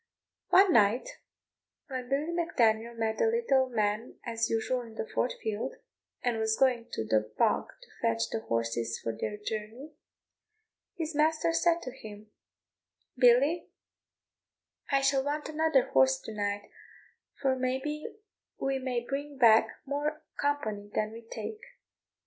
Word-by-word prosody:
One 385 0 +6
night 225 - +4 0.8
when 255 -3 -5
Billy 290 +5 0
Mac 340 -1 -3
Daniel 230 0 +3
met 225 -1 -1
the - - +4
little 360 - +2
man 215 0 -1
as 230 -1 -1
usual 240 +3 0
in 230 -2 -11
the - - -3
Fort 245 - -1
field, 220 +4 -2 0.5
and 240 -2 0
was 220 0 +1
going 250 -3 +2
to 110 - -2
the 110 0 +1
bog - - +2 0.2
to - - -17
fetch 115 0 +1
the - - -1
horses 115 0 -2
for 115 - -4
their 210 - -3
journey, 220 +7 -6 1.0
his 325 -3 -3
master 310 +2 +2
said 340 0 +2
to 255 - -5
him, 215 -4 -11 0.8
"Billy, 270 +7 +4 1.2
I 275 0 +4
shall 270 0 +3
want 295 +2 -2
another 310 -4 +2
horse 130 0 +4
to 220 - -8
night, 205 -1 -3 0.7
for 265 -2 +2
may 255 0 0
be 300 +2 -4 0.5
we 270 0 0
may 250 -2 -2
bring 285 +1 -4
back 225 -3 +6 0.2
more 295 +2 -2
company 220 -8 -2
than 215 0 0
we 230 +1 -9
take." 230 - -6
245 Hz, 145 wpm, -30 LUFS, 215-285 Hz, 1.2 s, One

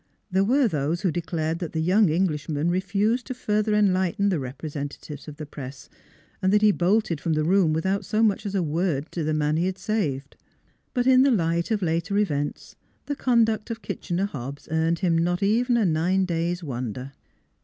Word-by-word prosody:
There 190 +1 +3
were 255 +5 +3
those 155 -1 -1
who 185 - +1
declared 165 -1 -2
that 170 -3 -5
the 160 - -1
young 185 +4 +4
Englishman 155 -2 0
refused 200 +6 0
to 255 - -4
further 215 -3 0
enlighten 200 0 +2
the 180 -5 0
representatives 145 +2 -6
of 150 - -8
the 155 - -6
press, 135 -1 -9 0.5
and 190 - +2
that 210 +1 +3
he 210 - +7
bolted 185 -3 +1
from 165 - 0
the 155 0 +1
room 180 0 +3
without 190 +5 0
so 215 +1 0
much 210 -3 +2
as 200 - -4
a 190 - +1
word 160 -1 -1
to 170 - -3
the 155 0 0
man 150 0 +1
he 175 +3 +1
had 190 0 -3
saved. 150 -13 -2 0.6
But 245 -1 +1
in 260 0 +6
the 275 - +5
light 170 -7 +1
of 215 -3 0
later 170 +4 0
events, 145 -8 -2 0.3
the 285 - -3
conduct 225 -5 +2
of 225 -2 -5
Kitchener 185 0 -2
Hobbs 140 -5 -7
earned 160 +1 +1
him 170 -2 +3
not 175 +3 0
even 235 +4 +2
a 225 - +2
nine 180 +3 +2
days' 175 0 -2
wonder. 125 -1 -5
175 Hz, 195 wpm, -25 LUFS, 155-205 Hz, 0.6 s, he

